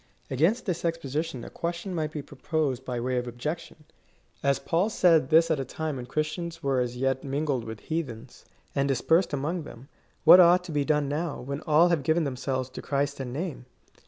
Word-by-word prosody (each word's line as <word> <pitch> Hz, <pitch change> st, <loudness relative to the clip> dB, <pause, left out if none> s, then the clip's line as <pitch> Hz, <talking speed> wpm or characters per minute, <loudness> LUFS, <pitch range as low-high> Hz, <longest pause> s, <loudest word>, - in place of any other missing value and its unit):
Against 170 Hz, -, +2 dB
this 180 Hz, -4 st, -2 dB
exposition 160 Hz, -4 st, -2 dB
a -, -, -9 dB
question 170 Hz, +3 st, -4 dB
might 155 Hz, -2 st, -2 dB
he 150 Hz, -, -4 dB
proposed 140 Hz, -2 st, -2 dB
by 125 Hz, -2 st, -3 dB
way 125 Hz, +1 st, -1 dB
of 125 Hz, 0 st, -2 dB
objection: 150 Hz, +6 st, -5 dB, 0.3 s
" -, -, -36 dB
As 140 Hz, 0 st, +3 dB
Paul 175 Hz, +6 st, 0 dB
said 165 Hz, -9 st, +4 dB
this 165 Hz, +1 st, +5 dB
at 155 Hz, -, +1 dB
a -, -, -1 dB
time 155 Hz, +1 st, -4 dB
when 125 Hz, -1 st, -7 dB
Chris 155 Hz, +4 st, -1 dB
tians 170 Hz, -2 st, -6 dB
were 135 Hz, -2 st, +1 dB
as 125 Hz, 0 st, -2 dB
yet 135 Hz, 0 st, 0 dB
mingled 140 Hz, -3 st, -1 dB
with 110 Hz, -1 st, -7 dB
heathens, 130 Hz, -7 st, -5 dB, 0.3 s
and 140 Hz, 0 st, +1 dB
dispersed 160 Hz, +7 st, +2 dB
among 150 Hz, +5 st, -2 dB
them, 135 Hz, -2 st, -12 dB, 0.3 s
what 170 Hz, +3 st, +10 dB
ought 180 Hz, 0 st, +6 dB
to 180 Hz, -, -8 dB
be 145 Hz, -2 st, +1 dB
done 150 Hz, 0 st, +1 dB
now, 150 Hz, +2 st, -2 dB
when 140 Hz, +3 st, -5 dB
all 160 Hz, +3 st, +5 dB
have 170 Hz, -4 st, +2 dB
given 160 Hz, +4 st, +2 dB
themselves 130 Hz, -2 st, -2 dB
to -, -, -7 dB
Christ 140 Hz, 0 st, -1 dB
in 125 Hz, -2 st, -5 dB
name 145 Hz, -3 st, -5 dB
150 Hz, 205 wpm, -27 LUFS, 130-165 Hz, 0.3 s, what